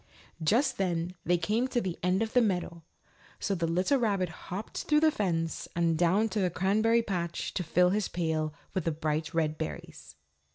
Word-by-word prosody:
Just 240 - +2
then 175 -2 -1
they 175 0 +2
came 215 +9 0
to 255 -2 0
the 185 -6 -3
end 185 +4 +2
of 220 - -5
the 250 - +5
meadow, 180 -5 -1 0.6
so 200 - -1
the 170 -3 -1
little 185 +11 +2
rabbit 200 -6 +1 0.2
hopped 195 +5 -5
through 300 0 +3
the 315 -1 +5
fence 165 - -1
and 170 -1 +2
down 180 +7 +3
to 215 - -2
the 185 -2 +2
Cranberry 215 +6 +2
Patch 175 -5 -3
to 180 - -1
fill 180 +2 +3
his 205 0 0
pail 160 -3 -1 0.2
with 185 -4 -2
the 165 - +2
bright 155 0 -2
red 155 -2 0
berries. 75 -3 -7
180 Hz, 190 wpm, -29 LUFS, 165-215 Hz, 0.6 s, the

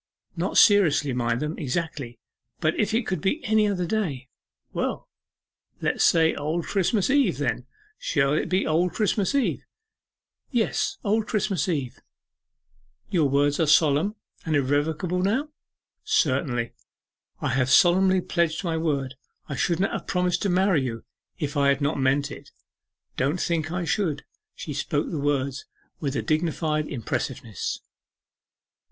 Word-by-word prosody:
'Not - - -1
seriously 165 - +5
mind 120 -1 0
them, 150 +2 -3
exactly 145 -4 -3 0.4
but 155 0 +1
if 210 +1 +1
it 225 +1 +1
could 185 -5 -2
be 195 - 0
any 220 -1 +3
other 185 -3 -1
day?' 160 - -2 0.4
'Well, - - -2 0.7
let - - 0
us - - +2
say 160 -1 +4
Old 155 +3 -2
Christmas 200 +3 +1
Eve, 280 -1 +3
then. - - -2 0.3
Shall 140 -2 +1
it 155 - 0
be 185 +1 +1
Old 170 +2 +1
Christmas 210 +3 0
Eve?' 275 - +1 0.9
'Yes, 235 -4 0
Old 215 +1 +1
Christmas 195 -4 0
Eve.' 140 -7 -2 1.1
'Your 160 -7 +2
word 145 +1 +2
is 160 -3 +3
solemn, 160 +7 +2 0.3
and 160 -2 0
irrevocable 150 +6 0
now?' 240 +11 0 0.5
'Certainly, 130 -5 0 0.7
I - - -1
have 130 0 +1
solemnly 185 +5 +5
pledged 170 0 0
my 165 -3 -1
word; 140 -5 -1 0.3
I 140 - -4
should 170 +6 0
not 195 - +1
have - - -5
promised 180 -1 0
to 200 - 0
marry 185 -3 +3
you 115 -3 -4 0.3
if 150 -3 -3
I 140 -1 +3
had 140 -1 +3
not 145 0 0
meant 140 +2 +1
it. 140 0 -10 0.7
Don't 145 +7 0
think 160 -3 -1
I 180 -1 -2
should.' 165 -6 -1 0.3
She 150 - -6
spoke 145 +1 -2
the 160 - -2
words 140 -1 -1 0.3
with 140 -3 -2
a - - -1
dignified 155 -1 0
impressiveness. 115 - -4
160 Hz, 145 wpm, -25 LUFS, 140-185 Hz, 1.1 s, seriously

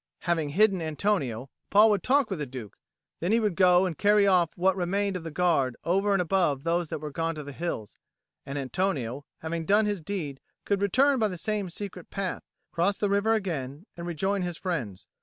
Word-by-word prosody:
Having 165 -4 0
hidden 195 +3 +3
Antonio, 150 - -1 0.2
Paul 215 +2 +6
would 205 -3 +1
talk 270 -1 +2
with 190 - -2
the 150 - -3
Duke; 125 -5 -8 0.4
then 175 +4 -1
he 230 - +4
would 210 -5 0
go 180 0 +5
and 180 -3 -2
carry 205 +2 +4
off 180 -4 +4
what 185 +1 +3
remained 195 +2 0
of 180 - -4
the 165 - -5
guard 155 -7 +1
over 195 +4 +1
and 195 - +3
above 170 -6 +1
those 170 -1 0
that - - -3
were 150 0 -6
gone 165 +2 -2
to 150 - -6
the 145 - -8
hills; 140 -9 -5 0.4
and 140 +1 -5
Antonio, 140 -3 -2 0.2
having 165 +1 -3
done 205 +6 +3
his 205 -4 -1
deed, 155 -6 -4 0.3
could 200 -1 0
return 260 +7 +3
by 220 - +3
the 185 -3 -5
same 205 +2 -2
secret 180 -1 -7
path, 195 -2 -3 0.3
cross 185 +4 +1
the 205 -1 0
river 210 +3 +3
again, 155 -6 -4
and 170 0 -6
rejoin 190 +4 -1
his 175 -2 -3
friends. 130 - -4
180 Hz, 205 wpm, -27 LUFS, 155-200 Hz, 0.4 s, Paul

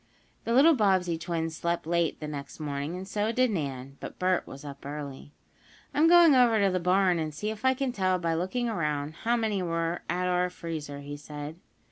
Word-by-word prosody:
The 230 - 0
little 305 +6 +7
Bobbsey 190 - +2
twins 165 0 -3
slept 170 +1 -2
late 170 0 0
the 150 - -5
next 145 0 -7
morning, 145 +2 -3
and 185 +1 -6
so 210 +2 0
did 255 0 +2
Nan, 135 -6 -4
but - - -8
Bert 185 0 +1
was 140 +2 -10
up 140 -1 -9
early. 145 -1 -7 0.6
"I'm 310 +3 +4
going 340 -2 +7
over 240 -4 +5
to 200 -1 +3
the 185 - 0
barn, 180 0 +3
and 155 -1 -2
see 210 +9 -3
if 220 +1 -9
I 260 0 +4
can 270 -1 -1
tell 185 -4 +1
by 170 -2 -1
looking 190 +9 -1
around 150 -9 -1
it, 160 - -15
how 235 +1 +3
many 215 -4 0
were 165 -1 -1
at 180 +1 0
our 180 0 +1
freezer," 155 -5 -6
he 145 +1 -7
said. 150 +2 -8
175 Hz, 210 wpm, -28 LUFS, 150-210 Hz, 0.6 s, little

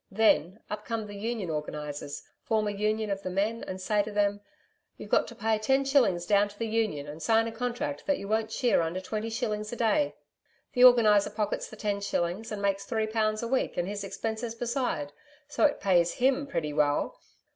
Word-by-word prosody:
Then, 200 -2 +2
up 210 0 -5
come 225 -1 -3
the 205 - -9
Union 205 -3 -3
organisers, 150 -1 -5 0.2
form 215 -1 0
a - - 0
Union 215 +1 -1
of 195 0 -2
the 185 - -4
men 205 +5 -1
and 185 - -5
say 205 +2 +1
to 215 +1 -5
them: 205 0 +1 0.6
"You've - - -10
got - - +4
to - - -10
pay 220 -1 0
ten 265 +5 +2
shillings 225 -11 +3
down 205 0 +3
to 205 - -16
the 230 - -2
Union 215 -10 -1
and 150 +2 -8
sign 225 +2 +3
a 230 - -3
contract 230 - -3
that 290 - +2
you 200 - -7
won't 220 +1 0
shear 240 -5 +2
under 165 +3 -2
twenty 215 +4 -4
shillings 215 -2 -2
a - - -4
day." 285 +6 +1 0.6
The 250 -1 +7
Organiser 215 -5 +6
pockets 210 0 -2
the - - -10
ten 205 -1 -2
shillings, 190 +3 -2
and 205 -1 -4
makes 200 0 +1
three 220 -2 0
pounds 215 0 0
a - - -1
week 260 +2 0
and 175 0 0
his 200 0 -4
expenses 220 +4 -4
besides, 235 - -2 0.3
so 295 - +2
it 290 - +2
pays 175 -3 +3
HIM 270 +3 +1
pretty 155 - -2
well. 145 0 +1
215 Hz, 210 wpm, -28 LUFS, 195-225 Hz, 0.6 s, The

